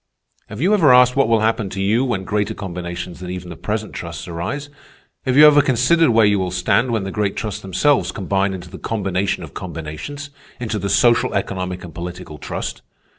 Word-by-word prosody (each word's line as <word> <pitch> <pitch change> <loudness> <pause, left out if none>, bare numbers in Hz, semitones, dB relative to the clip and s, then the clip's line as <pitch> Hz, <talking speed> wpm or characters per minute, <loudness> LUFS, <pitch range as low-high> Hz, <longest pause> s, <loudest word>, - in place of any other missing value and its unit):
Have 105 - -8
you 190 +6 +3
ever 165 -10 +5
asked 125 0 +6
what 135 -3 +3
will 115 -2 +3
happen 110 -2 0
to 95 - -6
you 105 +6 +2
when 120 -8 -1
greater 105 +1 -1
combinations 85 -2 -6
than 90 -1 -7
even 90 -1 -6
the - - -7
present 105 +4 -4
trusts 85 +1 -7
arise? 90 +13 -4 0.6
Have 130 +1 +2
you 150 - +10
ever 145 -1 +7
considered 140 +5 +3
where 115 -2 +5
you 105 -1 +3
will 95 -1 -1
stand 90 +7 +1
when 115 -4 0
the 95 - -4
great 105 -1 -1
trusts 105 -3 -4
themselves 95 +10 +1
combine 95 -1 -1
into 90 -2 -10
the - - -9
combination 95 -3 -1
of - - -10
combinations—into 110 - -7
the 100 +1 -3
social, 120 +4 +3
economic, 90 -1 -3
and 85 -3 -9
political 85 -2 -7
trust?" - - -5
100 Hz, 195 wpm, -20 LUFS, 90-125 Hz, 0.6 s, you